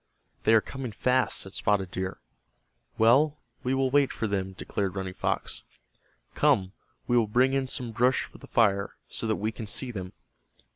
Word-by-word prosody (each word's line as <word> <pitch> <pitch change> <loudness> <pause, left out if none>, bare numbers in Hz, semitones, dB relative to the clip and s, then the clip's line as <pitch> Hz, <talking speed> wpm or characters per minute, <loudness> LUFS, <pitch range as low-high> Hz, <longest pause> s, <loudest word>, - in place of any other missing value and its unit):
"They 115 - +6
are 110 - +6
coming 130 -1 -6
fast," 125 +3 +2
said 95 - -5
Spotted 95 -3 0
Deer. 95 0 -3 0.8
"Well, 140 +7 +5 0.2
we 130 +1 0
will 135 -1 +1
wait 140 -1 +4
for 110 - -3
them," 95 -2 -2
declared 95 0 -3
Running 95 -1 -3
Fox. - - -2 0.7
"Come, 95 -1 +3 0.3
we 120 - +1
will 115 -3 +4
bring 125 +5 +3
in 135 -1 +1
some 125 -3 -2
brush 125 +3 +2
for - - -13
the - - -12
fire, 100 -4 +2
so 115 - -5
that 110 - +2
we 110 +2 -2
can 110 0 -7
see 125 +3 -1
them." 95 -4 -6
115 Hz, 180 wpm, -28 LUFS, 100-130 Hz, 0.8 s, They